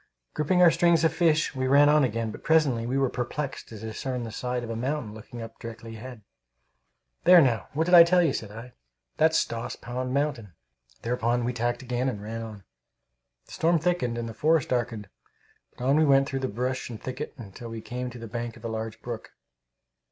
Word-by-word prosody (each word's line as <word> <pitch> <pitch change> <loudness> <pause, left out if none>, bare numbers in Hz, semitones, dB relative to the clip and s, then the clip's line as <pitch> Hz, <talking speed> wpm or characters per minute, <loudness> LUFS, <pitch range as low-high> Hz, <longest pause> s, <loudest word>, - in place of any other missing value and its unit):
Gripping 180 +4 +2
our 170 - +8
strings 170 0 +3
of 160 -1 +3
fish, 160 -3 +2
we 130 -1 -1
ran 140 +2 +6
on 150 0 +5
again, 115 -2 -1
but - - -11
presently 140 -8 +2
we 130 +2 0
were 135 -1 +3
perplexed 130 +3 -4
to 110 - -9
discern 120 +4 -4
the 115 - -6
side 125 +2 -3
of 115 - -5
a - - -3
mountain 125 -2 -3
looking 115 +2 -9
up 115 0 -11
directly 115 -1 -8
ahead. 120 -1 -10 1.0
"There, 180 +1 +8
now, 120 -9 +2
what 155 +3 +1
did 175 +2 -1
I 170 -1 +11
tell 175 +1 +4
you?" 155 -5 +2
said 110 -6 -4
I. 115 +4 -10 0.4
"That's 160 +1 +4
Stoss 115 0 -2
Pond 125 +1 -5
mountain." 130 - -1 0.5
Thereupon 120 0 0
we 125 - -1
tacked 120 +1 -2
again, 125 +1 -1
and 105 - -5
ran 110 +2 -6
on. 110 -3 -8 0.8
The - - -18
storm 170 +1 +2
thickened 160 -8 0
and 120 0 -3
the 115 - -6
forest 155 +2 +2
darkened, 120 -4 -2 0.7
but 125 - -5
on 140 +3 +4
we 155 - +5
went 135 -2 +4
through 135 - -3
brush 125 +4 -3
and 115 -3 -7
thicket 130 +5 -6 0.2
till 120 +3 -8
we 115 0 -6
came 125 +2 -5
to 125 - -10
the 115 - -8
bank 120 0 -5
of 115 - -12
a - - -2
large 110 0 -5
brook. 120 -2 -7
125 Hz, 210 wpm, -27 LUFS, 115-145 Hz, 1.0 s, I